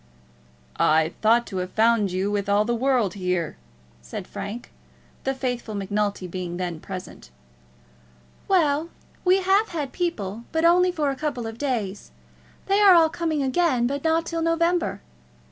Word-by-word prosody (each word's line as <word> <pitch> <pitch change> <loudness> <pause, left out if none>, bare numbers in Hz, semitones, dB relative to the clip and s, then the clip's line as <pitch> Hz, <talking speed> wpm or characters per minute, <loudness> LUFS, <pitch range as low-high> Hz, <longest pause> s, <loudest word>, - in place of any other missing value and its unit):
"I 160 +1 +3
thought 230 +2 +4
to 190 - -6
have 180 0 -4
found 220 -3 +3
you 190 +3 -1
with 205 -1 -1
all 205 +1 +3
the 240 - 0
world 245 -4 +1
here," 180 -4 -2 0.5
said - - -7
Frank, 225 +4 -7 0.5
the 270 0 0
faithful 245 -4 -3
Macnulty 205 0 -2
being 180 -1 -5
then 175 -3 -3
present. 185 - -9 1.2
"Well, 320 -4 +2 0.3
we 375 +1 +4
have 390 +4 +3
had 300 -6 -4
people, 230 - -3
but 320 0 +1
only 360 +2 +5
for 300 -5 0
a - - -4
couple 275 -5 -3
of 225 +1 -7
days. 225 -8 -3 0.6
They 395 +1 +2
are 395 -3 +8
all 325 -2 +6
coming 315 -3 -1
again, 265 -3 +2
but 280 +3 -2
not 325 0 +2
till 330 -1 -3
November. 335 +1 +1
245 Hz, 155 wpm, -24 LUFS, 200-330 Hz, 1.2 s, are